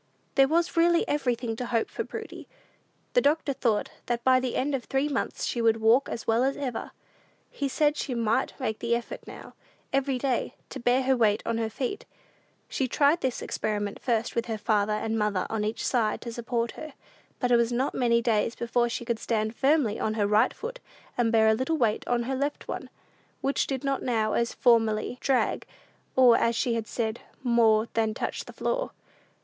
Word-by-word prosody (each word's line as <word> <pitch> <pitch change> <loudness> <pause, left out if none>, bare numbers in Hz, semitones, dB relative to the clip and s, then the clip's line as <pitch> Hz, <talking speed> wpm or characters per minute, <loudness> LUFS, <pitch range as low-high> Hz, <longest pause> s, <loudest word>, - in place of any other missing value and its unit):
There 270 -1 +5
was 335 +3 +1
really 340 0 +3
everything 245 -5 -1
to 245 - -4
hope 230 -2 0
for - - -4
Prudy. - - -8 0.7
The - - +5
doctor 295 -3 +1
thought 230 -5 0 0.2
that 240 -1 -1
by 255 0 +5
the 255 -1 -3
end 285 +2 0
of 260 -3 -2
three 270 +2 0
months 280 -2 -2
she 240 - -1
would 225 -1 +3
walk 230 +5 +4
as 230 - -5
well 225 +2 +2
as 270 +1 0
ever. 255 -5 -4 0.6
He 280 - -2
said 295 +2 +2
she 260 -4 -3
might 230 +4 0
make 220 -5 -2
the 235 0 +1
effort 235 0 -5
now, - - -10 0.4
every 270 -1 +1
day, 255 -1 -1 0.2
to 270 - -6
bear 245 +2 +2
her 265 +1 +3
weight 215 -4 +2
on 230 0 -1
her 225 -1 -1
feet. 275 - -4 0.6
She 265 - -1
tried 290 +6 +3
this 260 -2 -2
experiment 205 -1 -2
first 235 -2 0
with 235 0 -1
her 225 -2 -2
father 210 -1 +1
and 220 +1 -1
mother 210 -3 0
on 220 -1 -1
each 215 +2 -2
side 225 -4 +1
to 235 - -6
support 235 0 -2
her; 310 -2 -9 0.5
but 250 -1 0
it 240 - +6
was 235 0 +1
not 255 +3 0
many 235 -2 +2
days 230 -1 +1
before 235 0 0
she 240 - -4
could 230 -1 -1
stand 220 -1 -1
firmly 270 -6 +2
on 215 - -1
her 210 -2 +1
right 210 +4 +3
foot, - - -7 0.4
and 235 -2 +1
bear 220 -1 +4
a 220 - +5
little 260 +8 0
weight 225 -6 0
on 240 -1 +1
her 265 +3 -3
left 285 +2 -3
one, - - -5 0.5
which 275 - 0
did 270 -1 -3
not 275 -1 0
now, 220 -4 0
as 235 0 +1
formerly, 230 0 +2
drag, 265 -2 +1 0.5
or, 250 -3 +7
as 230 0 +2
she 240 +1 0
had 225 -1 -2
said, 225 -1 -2 0.2
"more 230 -3 +4
than 220 -1 0
touch - - -3
the - - -11
floor." - - -2
235 Hz, 200 wpm, -27 LUFS, 225-265 Hz, 0.7 s, or